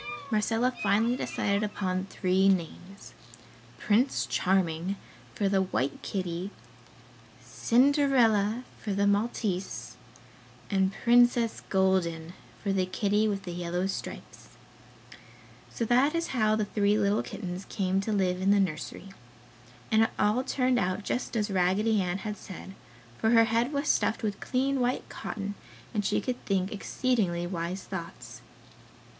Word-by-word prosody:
Marcella 225 +4 +1
finally 215 +4 +2
decided 200 -5 -1
upon 190 -3 -2
three 190 0 +2
names; 190 +2 -3 0.6
Prince 225 +6 +2
Charming 180 0 0 0.4
for 200 - +1
the 195 -1 +2
white 140 -7 -2
kitty, 185 -1 -3 1.0
Cinderella 245 -4 +3 0.2
for 210 - -2
the 200 +1 +1
Maltese 200 -2 -1 0.7
and 190 -1 +2
Princess 240 -1 +4
Golden 180 -4 +1 0.3
for 200 -1 0
the 185 -1 +1
kitty 205 +3 +1
with 200 -2 -2
the 180 - -6
yellow 175 +1 -2
stripes. 195 - -6 1.2
So 230 - -3
that 255 +7 +3
is 335 0 -1
how 215 -4 +2
the 215 -1 0
three 205 0 +1
little 205 0 +2
kittens 185 -2 -6
came 195 -2 0
to 220 - -3
live 185 -3 +1
in 190 - +2
the 200 0 +5
nursery. 185 +1 -3 0.8
And 220 0 +5
it 225 - +3
all 215 +5 +2
turned 255 -2 +1
out 185 +2 -1
just 245 +3 -3
as 210 -1 -1
Raggedy 195 +4 +2
Ann 180 0 -1
had 210 +1 -5
said, 190 0 -9 0.5
for 220 - +2
her 230 0 +6
head 230 +4 +1
was 285 0 -2
stuffed 220 - +1
with 205 -2 -2
clean 270 +1 0
white 245 0 0
cotton, 205 -1 -5 0.4
and 210 -2 0
she - - +1
could 250 -1 -4
think 190 -1 0
exceedingly 205 -5 0
wise 175 +1 -4
thoughts. 125 - -8
200 Hz, 140 wpm, -28 LUFS, 185-225 Hz, 1.2 s, her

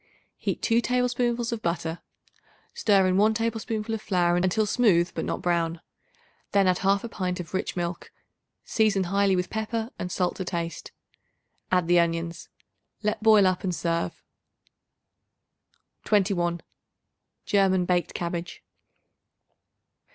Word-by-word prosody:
Heat - - -3
2 230 0 +3
tablespoonfuls 245 -1 0
of 230 -2 -3
butter. 170 -2 -2 0.7
Stir 200 - +3
in 185 0 +2
1 215 +2 +4
tablespoonful 225 0 -2
of 220 - -3
flour 175 -4 +1
until 185 +4 +1
smooth 195 -6 +3
but - - -3
not - - -3
brown; 170 -1 0 0.7
then 200 -1 +4
add 185 -1 +3
1/2 200 +3 +1
pint 185 -3 -3
of 175 -1 -7
rich 190 - -2
milk; 175 -1 -4 0.5
season 215 -3 +2
highly 195 +1 +2
with 180 0 -2
pepper, 220 +2 -3
and 180 - -4
salt 180 0 -1
to 190 - -3
taste. 170 -2 -4 0.8
Add 180 -2 +2
the 175 0 +5
onions; 170 0 -2 0.5
let 210 0 -1
boil 215 -2 +6
up 185 -1 +1
and 180 -2 -1
serve. 170 +2 -2 1.8
21. 180 -5 +1 0.8
German 190 -2 +3
Baked 175 -1 0
Cabbage. 170 0 -4
185 Hz, 130 wpm, -26 LUFS, 175-215 Hz, 1.8 s, boil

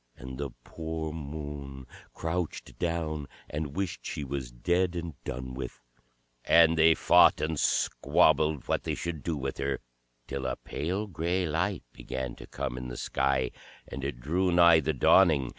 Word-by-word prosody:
And 65 0 -8
the 70 -1 -2
poor 80 -1 -5
Moon 70 -3 -6 0.3
crouched 85 0 -3
down, 80 -4 -2 0.2
and 75 -1 -4
wished 95 -2 -3
she 75 - -4
was 65 -3 -4
dead 90 +9 +1
and 85 -1 -4
done 65 0 -5
with. 65 - -6 0.6
And 80 0 +6
they 80 0 +6
fought - - +6
and 80 -1 -1
squabbled 75 -3 +2
what - - +1
they - - -2
should 85 -3 -4
do 80 0 -2
with 70 0 -4
her, 70 0 -1 0.5
till 70 0 -3
a 65 - -1
pale 90 +8 -3
grey 90 0 -1
light 85 +5 -1
began 65 -2 -5
to - - -11
come 60 - -4
in 65 - -6
the - - -6
sky; 65 -1 0 0.4
and 65 - -6
it 70 -3 -3
drew 90 +8 +1
nigh 85 -1 +7
the 80 0 0
dawning. 75 -1 +5
75 Hz, 160 wpm, -29 LUFS, 70-85 Hz, 0.6 s, nigh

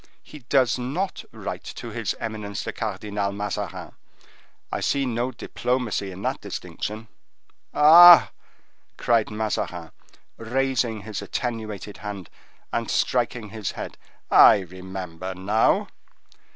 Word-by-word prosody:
he 150 - -12
does 130 -2 +3
not 150 +11 -3
write - - -6
to - - -8
his - - -2
eminence 105 -3 -5
the - - -5
Cardinal 100 -1 -3
Mazarin. 100 0 -5 0.8
I - - -2
see 140 -1 0
no 120 0 -1
diplomacy 125 -7 -2
in 95 +1 -9
that - - -2
distinction." 110 +2 -6 0.6
"Ah!" 170 +3 +9 0.7
cried 115 -2 +2
Mazarin, 105 -6 -3 0.5
raising 120 -2 -1
his 105 0 -6
attenuated 110 -5 -5
hand, 100 -4 -7 0.4
and 115 -1 -1
striking 120 -3 0
his 105 -2 -5
head, - - -7 0.4
"I 100 - +8
remember 95 0 -7
now!" 100 +4 +1
110 Hz, 110 wpm, -24 LUFS, 100-125 Hz, 0.8 s, Ah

